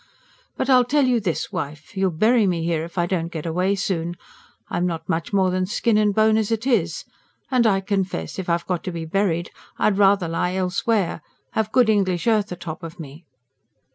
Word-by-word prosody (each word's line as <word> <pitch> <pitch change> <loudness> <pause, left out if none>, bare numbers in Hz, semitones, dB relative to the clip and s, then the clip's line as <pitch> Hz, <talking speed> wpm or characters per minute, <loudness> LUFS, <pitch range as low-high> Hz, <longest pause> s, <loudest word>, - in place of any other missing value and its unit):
But - - -1
I'll 255 -2 +6
tell 280 +3 +2
you 250 -2 +2
this, 185 -6 -2
wife. 150 +5 -6
You'll 190 -1 +2
bury 215 +6 +3
me 170 -3 0
here, 165 -1 0
if 170 +2 -10
I 175 - +2
don't 175 -2 -2
get 160 -2 -5
away 180 +4 +1
soon. 175 -3 -2 0.5
I'm 175 +1 -1
not 165 -2 -4
much 165 0 -2
more 190 -2 +2
than 185 0 0
skin 220 +2 +1
and 210 -1 +3
bone 215 +1 +3
as 220 0 0
it 225 +1 -1
is. 190 -11 0 0.5
And 245 -3 +4
I 195 -2 +2
confess, 190 - -2
if 185 - -4
I've 170 0 0
got 180 -2 -2
to 185 - -2
be 165 -1 -5
buried 175 -1 0 0.3
I'd 205 -1 +2
rather 195 -3 +4
lie 180 +2 -1
elsewhere 185 0 0 0.3
have 220 -1 -1
good 250 -1 +4
English 190 -5 +1
earth 215 -4 +2
atop 170 -2 -6
of 165 0 -9
me." 155 +2 -10
185 Hz, 200 wpm, -22 LUFS, 170-215 Hz, 0.5 s, I'll